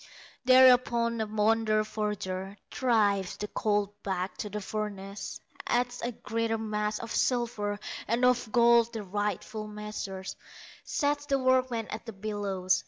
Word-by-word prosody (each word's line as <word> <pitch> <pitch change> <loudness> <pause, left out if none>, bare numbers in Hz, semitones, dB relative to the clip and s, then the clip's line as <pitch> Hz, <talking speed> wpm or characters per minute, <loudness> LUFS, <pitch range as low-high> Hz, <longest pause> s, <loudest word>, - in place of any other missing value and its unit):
Thereupon 250 -2 +6
the 220 -1 -1
wonder 215 0 +2
forger 200 -2 -3
Drives 205 -7 +2
the 210 - -4
colt 205 -1 -1
back 185 -1 -2
to 210 - -4
the 210 +1 -4
furnace, 200 -1 -5 0.3
Adds 245 0 0
a 240 - -1
greater 225 0 -2
mass 210 -1 -1
of 230 0 -7
silver, 230 -5 0 0.3
And 235 +2 +2
of 245 -3 +2
gold 235 0 +5
the 220 -2 -4
rightful 210 +2 -3
measure, 210 -2 -6 0.6
Sets 290 0 0
the 275 -1 +2
workmen 255 -3 +2
at 220 +2 -6
the 225 - -5
bellows. 195 -2 0
215 Hz, 135 wpm, -29 LUFS, 205-235 Hz, 0.6 s, Thereupon